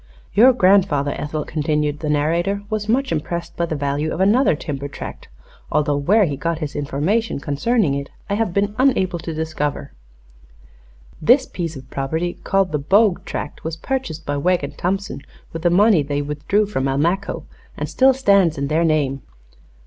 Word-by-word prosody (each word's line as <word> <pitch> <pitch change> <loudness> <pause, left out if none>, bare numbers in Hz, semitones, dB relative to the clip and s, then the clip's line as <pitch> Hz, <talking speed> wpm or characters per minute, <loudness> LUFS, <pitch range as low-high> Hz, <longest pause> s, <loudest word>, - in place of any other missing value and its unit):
"Your 245 +5 +7
grandfather, 185 - +3
Ethel," 150 0 -4
continued 150 -1 -1
the 155 - -3
narrator, 170 +7 0
"was 215 0 -2
much 265 +4 +1
impressed 170 +2 -3
by 170 - -1
the 160 - -3
value 145 +2 -1
of - - -4
another 205 - +4
timber 140 -2 -5
tract, 140 - -8 0.4
although 150 -1 +1
where 195 +10 +3
he 145 -4 -2
got 165 +3 -2
his 150 -2 -5
information 150 +11 -1
concerning 145 - +1
it 140 0 -4 0.2
I - - -2
have 215 -2 0
been 200 +3 0
unable 190 -10 +2
to 165 - -5
discover. 155 - -3 1.3
This 255 - +5
piece 165 -3 -5
of 130 -2 -10
property, 160 +6 -2
called 195 -1 +1
the 150 - 0
Bogue 195 +6 +3
tract, 145 - -6
was 160 0 -4
purchased 260 - -4
by 145 0 -2
Wegg 175 +3 +1
and 140 - -5
Thompson 195 -3 -2 0.3
with 165 - -5
the 175 - +3
money 195 0 +5
they 145 0 -2
withdrew 150 +9 0
from 160 -10 -2
Almaquo, 165 +9 -1 0.3
and - - -3
still 265 0 +4
stands 200 - +3
in 140 0 -2
their 160 +2 +2
name." 145 -4 +1
165 Hz, 170 wpm, -20 LUFS, 145-200 Hz, 1.3 s, Your